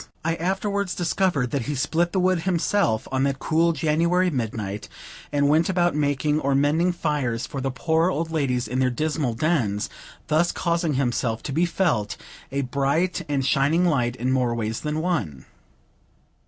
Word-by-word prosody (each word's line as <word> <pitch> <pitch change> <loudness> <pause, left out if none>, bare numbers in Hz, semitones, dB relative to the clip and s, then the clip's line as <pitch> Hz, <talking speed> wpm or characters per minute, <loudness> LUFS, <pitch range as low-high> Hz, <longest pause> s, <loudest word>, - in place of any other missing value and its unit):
I 165 - +2
afterwards 195 +2 -1
discovered 175 -7 0
that 135 -5 -2
he 145 - -1
split 170 +6 0
the 190 - 0
wood 185 -1 +2
himself 170 - +1
on 130 0 0
that 140 0 +1
cool 165 +4 +2
January 170 +4 +1
midnight, 110 -6 -4 0.4
and 145 -1 +2
went 155 +4 +3
about 175 -2 +2
making 150 0 +1
or 140 -2 +1
mending 150 +6 +2
fires 145 -9 -1
for 135 - -5
the 135 - -1
poor 160 +5 +1
old 165 -2 -2
ladies 130 -7 0
in 125 +3 -2
their 130 -1 +3
dismal 145 -1 -1
dens; 115 -8 0 0.3
thus 160 +2 +2
causing 170 -4 0
himself 120 -3 -1
to - - -4
be 165 +6 +2
felt 160 - 0 0.3
a 140 +1 0
bright 140 +7 0
and 140 -2 0
shining 145 +7 +3
light 125 -8 +1
in 130 +1 -1
more 125 -3 +1
ways 110 -1 -2
than 150 +1 -2
one. 110 - -2
150 Hz, 170 wpm, -24 LUFS, 130-170 Hz, 0.4 s, went